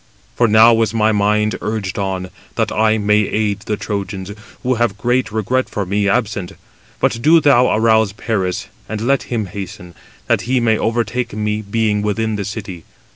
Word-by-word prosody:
For 120 - +3
now 115 +1 +6
is 115 0 0
my 110 0 +3
mind 105 +1 +1
urged 105 -3 -3
on, 95 -2 -3 0.2
that - - 0
I 110 0 +2
may 105 0 +3
aid 105 0 0
the 105 - -3
Trojans, 100 -2 -4 0.3
who 130 0 +1
have 120 -4 0
great 120 +2 0
regret 115 +5 -1
for 100 - -3
me 100 +2 0
absent. 100 -5 -1 0.5
But 115 - 0
do 165 +6 +6
thou 135 -5 +4
arouse 110 -1 +3
him 100 - -14
[Paris], 95 -5 -2 0.2
and 110 0 -3
let 135 +4 +2
him 115 -4 -1
hasten, 95 -2 -8 0.3
that - - +1
he 130 0 +3
may 115 -2 +2
overtake 115 +2 -1
me 105 0 -2
being 105 0 0
within 110 +1 -1
the 100 -1 -3
city. 100 -5 -6
110 Hz, 180 wpm, -18 LUFS, 100-115 Hz, 0.5 s, now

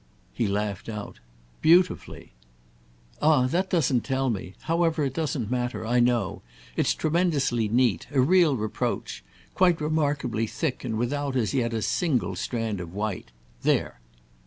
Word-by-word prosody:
He 115 - 0
laughed 100 +1 -2
out. 105 -2 -7 0.4
"Beautifully!" 180 +3 +2 0.9
"Ah 150 -4 +4
that 180 +8 0
doesn't 140 - +2
tell 135 -1 0
me. 95 -3 -5
However, 165 -1 +1
it 135 -2 -1
doesn't 135 -7 -2
matter—I 125 -1 0
know. 120 -1 +1 0.3
It's - - +1
tremendously 150 -8 +1
neat—a 120 - +1
real 165 +2 +4
reproach; 110 -1 -3 0.3
quite 180 -3 +3
remarkably 145 -7 0
thick 150 +3 -3
and 115 -4 -2
without, 140 +3 -1
as 110 -6 0
yet, 115 -2 +1
a 110 -2 -2
single 120 - 0
strand 110 +1 -2
of 85 +1 -8
white. 105 - -3 0.3
There!" - - 0
125 Hz, 135 wpm, -26 LUFS, 110-155 Hz, 0.9 s, Ah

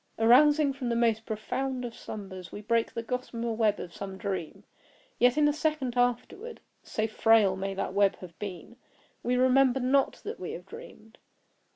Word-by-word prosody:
Arousing 280 +5 +5
from 260 -3 -4
the 235 - 0
most 225 -1 +1
profound 255 +4 -3
of 235 - -6
slumbers, 190 -6 -8
we - - -7
break 230 +2 0
the 230 - -3
gossamer 235 -1 -3
web 215 -2 +1
of 175 - -7
some 195 -1 -6
dream. 190 -6 -5 0.6
Yet 245 +3 +4
in 300 -1 +5
a 295 - +2
second 300 -5 -1
afterward, 245 - -1 0.2
(so 215 - -2
frail 220 -3 +4
may 195 +1 -4
that 190 - -3
web 200 0 +3
have 175 -3 -13
been) 200 +3 -7 0.4
we 245 +1 0
remember 260 +1 +4
not 265 +2 +2
that 440 +3 -6
we - - -5
have - - -8
dreamed. 350 - -13
235 Hz, 175 wpm, -28 LUFS, 205-260 Hz, 0.6 s, Arousing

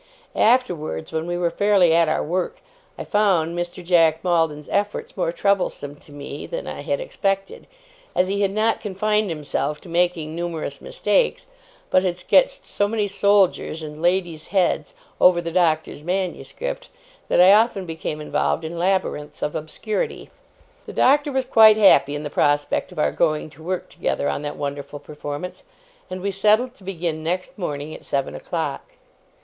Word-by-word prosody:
Afterwards, 180 - +1
when 160 +1 -2
we 175 0 -2
were 175 -1 0
fairly 200 -5 +4
at 165 -1 +4
our 155 - 0
work, 180 +3 -2 0.4
I - - -5
found 185 -6 +1
Mr. 175 0 -5
Jack 165 -3 +3
Maldon's 165 -4 0
efforts 205 - -2
more - - 0
troublesome 190 - -1
to 145 - -15
me 145 0 -7
than - - -5
I - - -6
had - - -1
expected, 195 - -3 0.5
as 180 - +3
he 200 +1 -1
had 200 - +3
not 215 +3 0
confined 210 0 0
himself 150 -1 -2
to 180 - -13
making 170 -2 0
numerous 170 -2 -4
mistakes, - - 0 0.5
but 185 - +5
had 180 -2 -1
sketched - - +2
so 205 - 0
many 210 -1 -1
soldiers, 200 -5 +2
and 150 0 -8
ladies' 175 -3 0
heads, 195 - 0 0.3
over 180 -1 +6
the 170 -1 -4
Doctor's 160 -4 +1
manuscript, 195 - -4 0.4
that - - +3
I 185 +2 +8
often 215 -3 +3
became 160 -2 -5
involved 155 +1 -1
in 165 +1 -5
labyrinths 175 -5 -1
of 150 - -1
obscurity. 190 +7 -4 0.6
The - - -7
Doctor 290 +2 +3
was 265 -1 0
quite 220 -4 +7
happy 145 -9 +5
in 145 - -4
the 145 - -5
prospect 145 +4 +1
of 180 - -13
our 150 - +2
going 155 -2 0
to 155 - -17
work 180 +2 -4
together 145 - -2
on - - -1
that 145 0 -5
wonderful 145 0 -5
performance, 145 +4 -7 0.5
and 185 0 -5
we 200 +1 -1
settled 215 +6 +2
to 205 - -20
begin 170 -4 -3
next 180 +3 -3
morning 150 -3 -4
at - - -11
seven 140 -1 -2
o'clock. - - -4
180 Hz, 165 wpm, -22 LUFS, 155-205 Hz, 0.6 s, I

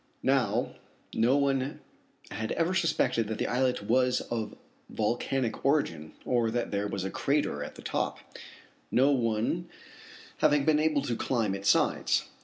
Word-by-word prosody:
Now - - +1 0.4
no 120 +5 +3
one 140 -1 0 0.5
had 110 +2 -3
ever 170 +2 0
suspected 135 - +1
that 110 - -3
the - - -1
islet 125 -2 0
was 125 +3 +2
of 115 -2 -3 0.3
volcanic 120 +2 -1
origin, 85 - 0
or 120 -2 +2
that 120 +1 -2
there 100 0 -1
was 100 -2 -3
a 95 - -3
crater 140 - 0
at - - -8
the - - -12
top, - - -1 0.7
no 135 +3 +4
one 120 +7 0 0.7
having 150 -2 +3
been 155 -1 +4
able 155 -2 +2
to 120 -5 -1
climb 115 -5 0
its 100 0 -1
sides. - - +2
125 Hz, 150 wpm, -29 LUFS, 110-140 Hz, 0.7 s, no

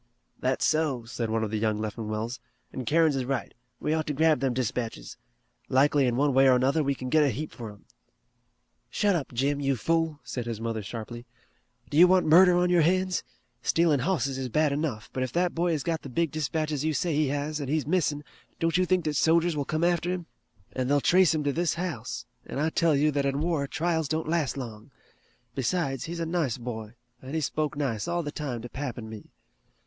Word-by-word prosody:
"That's 130 +1 0
so," 150 -7 +1
said 115 -1 -3
one 110 0 0
of 105 - -3
the 110 - -1
young 110 -1 +1
Leffingwells, 110 +2 -4 0.3
"an' 130 - -5
Kerins 160 +2 +3
is 130 - -1
right. 135 +2 -3 0.3
We 155 - 0
ought 160 -1 -1
to 150 - -2
grab 160 -1 +3
them 135 0 +1
dispatches. 125 -2 -3 0.5
Likely 140 +1 +4
in 120 - 0
one 140 +2 +2
way 135 +1 +5
or 130 - +6
another 135 +5 +2
we 140 0 0
kin 130 -1 -6
git 155 - +5
a 145 - +4
heap 150 +6 -4
fur 115 -3 -8
'em." 100 - -20 1.0
"Shut 205 -2 +2
up, 150 -6 -3
Jim, 140 +4 0
you 135 -1 +1
fool," 165 +4 0
said 120 -2 -5
his 115 -2 -4
mother 115 -1 -3
sharply. 115 +3 -7 0.6
"Do 145 - 0
you 175 +2 +9
want 185 0 +4
murder 175 +3 +7
on 180 0 +2
your 175 -1 +5
hands? 185 +2 +2 0.4
Stealin' 165 -4 +3
hosses 140 -3 0
is 130 -1 -3
bad 150 +4 +2
enough, 140 -7 -3
but 130 - -2
if 130 - -1
that 175 0 +1
boy 170 +1 +1
has 150 - -2
got 165 -2 -1
the 140 - -8
big 165 +4 0
dispatches 155 -1 -2
you 155 -1 0
say 170 +1 0
he 150 0 +2
has, 145 +2 -2
an' 140 - -4
he's 155 +2 0
missin', 150 -3 0 0.4
don't 165 0 +1
you 185 0 +2
think 185 -2 +1
that 150 -1 -1
sojers 165 +2 +3
will 145 -1 -1
come 155 +3 -1
after 175 0 +2
him? 180 -1 -3 0.5
An' 130 -1 -1
they'll 145 +1 +3
trace 180 +2 +4
him 155 - -1
to 145 -1 0
this 170 +1 0
house, 175 -2 -4 0.2
an' - - -5
I 155 +3 +1
tell 165 -2 +3
you 150 +2 +3
that 140 -1 0
in 140 +1 -1
war 155 -3 0
trials 160 0 -1
don't 160 +2 -2
last 160 -4 0
long. 115 -4 -7 0.6
Besides, 135 +1 -1
he's 170 +1 -5
a 165 - -1
nice 160 -8 -1
boy 115 -2 -6 0.3
an' 135 +4 -6
he - - +1
spoke 150 +1 -2
nice 125 -8 -2
all 175 0 -1
the 145 - -4
time 130 -7 -4
to - - -5
pap 130 -1 -5
an' 110 -2 -7
me." 110 -2 -10
145 Hz, 225 wpm, -27 LUFS, 130-165 Hz, 1.0 s, you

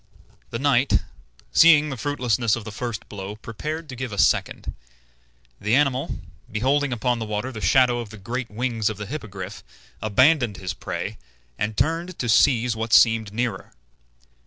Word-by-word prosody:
The 115 - -3
knight, 135 0 +2 0.5
seeing 155 - +6
the - - -3
fruitlessness 120 -3 0
of 120 - -6
the 110 - -7
first 120 +1 -5
blow, 100 0 -7
prepared 150 +9 -6
to 130 - -6
give 125 -1 -5
a 105 - -6
second. - - +1 0.9
The 105 +4 +1
animal, 135 -2 +1 0.3
beholding 135 +6 +1
upon 120 0 0
the 110 - -3
water 105 +4 -3
the 110 -4 -7
shadow 125 +6 +4
of 115 -3 -6
the 105 - -11
great 120 +5 -4
wings 115 -1 -1
of 110 - -5
the 105 - -5
Hippogriff, 100 -6 -7 0.4
abandoned 120 - +3
his 90 -2 -4
prey, - - -5 0.4
and 105 - -3
turned 165 +3 -1
to 120 - -3
seize 120 +1 +4
what 115 0 -3
seemed 115 -3 +5
nearer. 115 -3 -3
120 Hz, 160 wpm, -23 LUFS, 105-130 Hz, 0.9 s, seeing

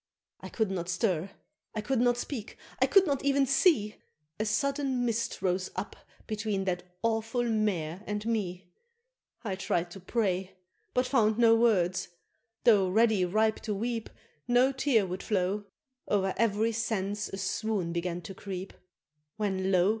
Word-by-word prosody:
I - - -8
could 220 -4 -1
not 175 -2 -3
stir 180 -1 0 0.5
I 215 - -1
could 255 +3 0
not 245 -1 +3
speak 240 -3 -5 0.2
I - - +4
could 390 -1 +6
not 280 -4 -1
even 280 0 +3
see 270 - +3 0.4
A 215 - 0
sudden 270 +2 0
mist 230 -1 -2
rose 185 0 0
up - - -4 0.3
between 215 -3 -2
that 180 -2 -1 0.2
awful 225 +1 0
Mare 200 -7 -1
and 210 0 -3
me, 190 -5 -2 0.7
I 200 -5 -2
tried 175 -2 -1
to 195 - -9
pray, 190 -2 -1 0.4
but 250 +1 +3
found 220 -5 +2
no 230 -1 +6
words 195 -6 +2 0.6
tho' 200 -5 +5
ready 215 -1 +3
ripe 215 +4 +1
to 210 -3 -3
weep, 230 +2 -3 0.4
No 245 +2 +4
tear 265 -6 +2
would 185 +1 -5
flow, 200 0 -1 0.4
o'er 195 -2 +1
ev'ry 220 0 +2
sense 210 -2 -2
a 195 - -6
swoon 195 -2 -1
began 175 0 -2
to 175 +3 -8
creep, 190 0 -6 0.6
When 190 -3 0
lo! 180 0 +4
210 Hz, 155 wpm, -29 LUFS, 190-230 Hz, 0.7 s, could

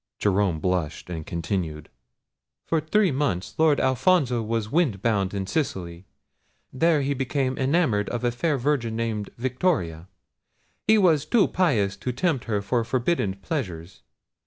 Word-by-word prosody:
Jerome 100 -5 +1
blushed, 90 -1 -2
and 80 -3 -5
continued. 85 -3 -3 0.8
"For 165 -1 +1
three 190 +4 +2
months 130 -10 -1
Lord 155 -3 +4
Alfonso 130 -2 +2
was 110 -1 -2
wind 140 - +1
bound 100 -5 +1
in 100 -1 -3
Sicily. 95 - -3 0.7
There 155 +2 +2
he 140 +1 0
became 130 0 -1
enamoured 130 - +1
of 120 0 -3
a 120 - +2
fair 145 +5 0
virgin 125 -4 0
named 110 -3 -2
Victoria. 120 - -1 0.8
He 220 - +6
was 160 -7 +3
too 220 +4 +4
pious 110 - +1
to 125 +6 -3
tempt 135 +1 -1
her 105 -3 -1
to 120 +3 0
forbidden 120 - 0
pleasures. 90 - -5
120 Hz, 140 wpm, -25 LUFS, 95-150 Hz, 0.8 s, He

